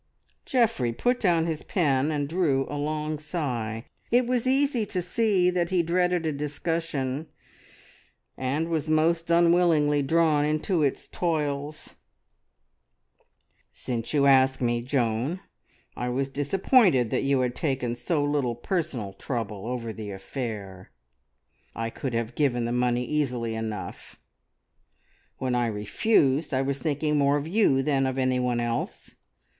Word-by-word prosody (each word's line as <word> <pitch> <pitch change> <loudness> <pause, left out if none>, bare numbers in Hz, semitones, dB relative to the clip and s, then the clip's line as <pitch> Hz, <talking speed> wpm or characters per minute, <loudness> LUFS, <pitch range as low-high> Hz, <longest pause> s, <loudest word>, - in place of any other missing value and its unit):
Geoffrey 230 - +2
put 245 - 0
down 170 -6 +2
his 160 -2 -2
pen 145 -6 +1
and 145 -2 -1
drew 150 -5 +1
a - - -7
long 150 +1 -2
sigh. 125 -9 -3 0.2
It 245 +1 +3
was 250 0 0
easy 270 -3 +2
to 185 - -2
see 180 0 +2
that 175 -1 0
he 180 -2 +2
dreaded 180 0 +1
a 155 - +1
discussion, 150 -1 -3 1.1
and 145 +6 -2
was 160 -2 -1
most 165 +2 +2
unwillingly 170 -4 +4
drawn 155 0 +3
into 155 +4 0
its 140 -3 -1
toils. 150 -3 -3 1.7
"Since 120 -2 -4
you 145 -2 +3
ask 130 -1 +5
me, 120 -1 0
Joan, 125 +5 -1 0.6
I 125 - -3
was 135 +2 -1
disappointed 145 - +3
that - - +1
you 135 -1 +2
had 125 -1 0
taken 130 -6 -1
so 145 +6 -1
little 145 -5 0
personal 120 - -3
trouble 110 -4 -4
over 120 -2 -4
the 110 -2 -7
affair. 100 -2 -6 0.9
I 115 0 -3
could 130 -1 -4
have 115 0 -2
given 120 -4 +1
the 120 - -2
money 125 0 +1
easily 125 -6 -1
enough; 110 -2 -6 1.2
when 130 -1 -2
I 120 -1 +1
refused 135 - +1
I 130 - +1
was 140 0 -2
thinking 150 -1 0
more 140 +1 +3
of 145 +1 -4
you 165 -8 +3
than 135 -2 +1
of 130 0 -3
any 130 -1 +1
one 125 -1 0
else. 120 0 -3
140 Hz, 140 wpm, -26 LUFS, 125-165 Hz, 1.7 s, ask